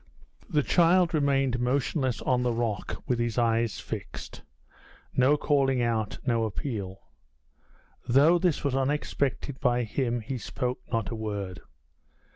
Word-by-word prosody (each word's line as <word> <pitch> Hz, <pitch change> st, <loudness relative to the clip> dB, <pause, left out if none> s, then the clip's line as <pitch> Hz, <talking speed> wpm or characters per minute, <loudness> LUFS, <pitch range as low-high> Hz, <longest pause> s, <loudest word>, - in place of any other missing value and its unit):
The 150 Hz, -5 st, +2 dB
child 175 Hz, +2 st, +4 dB
remained 135 Hz, -4 st, +2 dB
motionless 130 Hz, +1 st, 0 dB
on 125 Hz, -1 st, +2 dB
the 125 Hz, -1 st, +1 dB
rock, 115 Hz, -4 st, -3 dB
with 125 Hz, -2 st, 0 dB
his 120 Hz, -1 st, -1 dB
eyes 115 Hz, -5 st, +1 dB
fixed -, -, -7 dB, 0.7 s
no 135 Hz, +4 st, +4 dB
calling 135 Hz, -3 st, +2 dB
out, 110 Hz, -3 st, -1 dB
no 115 Hz, -3 st, +2 dB
appeal. 100 Hz, -5 st, -5 dB, 1.0 s
Though 145 Hz, +8 st, +5 dB
this 175 Hz, -4 st, +1 dB
was 140 Hz, -2 st, 0 dB
unexpected 135 Hz, 0 st, -1 dB
by 125 Hz, -2 st, +2 dB
him, 120 Hz, +1 st, -1 dB
he 125 Hz, +3 st, -4 dB
spoke 125 Hz, +2 st, -3 dB
not 115 Hz, -3 st, -1 dB
a -, -, -3 dB
word. 100 Hz, -4 st, -4 dB
125 Hz, 130 wpm, -27 LUFS, 115-140 Hz, 1.0 s, Though